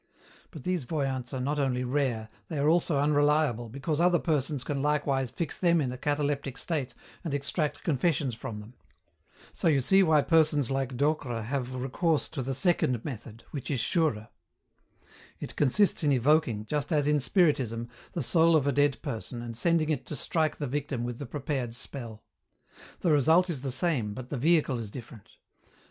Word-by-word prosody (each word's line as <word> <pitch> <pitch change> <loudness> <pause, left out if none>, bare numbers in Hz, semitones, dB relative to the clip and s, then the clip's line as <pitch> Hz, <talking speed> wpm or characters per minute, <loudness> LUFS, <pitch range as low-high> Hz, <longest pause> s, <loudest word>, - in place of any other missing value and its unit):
But 155 -7 -10
these 180 -4 -1
voyants 135 -4 -2
are 130 - -3
not 145 +4 -1
only 130 -3 0
rare, 125 -4 -1 0.2
they 160 - -4
are 140 +1 +2
also 165 -2 +3
unreliable, 145 -4 +2
because 140 +6 -2
other 175 0 +4
persons 145 -4 -1
can 140 0 -2
likewise 140 -3 +1
fix 165 +5 -4
them 170 -2 +4
in 130 -5 -1
a 125 - -6
cataleptic 145 -2 -1
state 140 -7 -3 0.3
and 160 -5 -2
extract 145 +2 -2
confessions 145 -3 +1
from 110 -1 -6
them. 110 +4 -13 0.8
So - - -1
you 150 -4 +4
see 190 +9 +5
why 155 -5 +4
persons 155 -5 +3
like 135 -2 -2
Docre 140 -5 0
have 130 +1 -3
recourse 145 +5 0
to 155 -4 -4
the 135 +1 -3
second 130 - +1
method, 115 -4 -7
which 140 -4 -6
is 135 - 0
surer. 115 -7 0 1.1
It - - -7
consists 160 +8 +2
in 145 - +3
evoking, 130 -4 +2
just 145 +5 -2
as 150 -3 +2
in 150 0 +3
Spiritism, 130 - +1 0.3
the 170 - -2
soul 165 -1 +4
of 150 -3 +3
a 140 - +2
dead 145 0 +2
person 120 +1 -5
and 115 -1 -6
sending 160 +3 +2
it 145 - -2
to - - -4
strike 155 +3 0
the 145 - -3
victim 140 -2 -3
with 120 -1 -4
the 140 - -6
prepared 135 -4 -3
spell. 120 -4 -8 0.8
The 170 - +2
result 160 +5 +4
is 140 -6 -4
the 135 - -3
same 130 -6 0
but 130 +1 -8
the 145 - -3
vehicle 150 -4 +2
is 110 -3 -6
different. 110 -2 -11
140 Hz, 180 wpm, -28 LUFS, 125-155 Hz, 1.1 s, see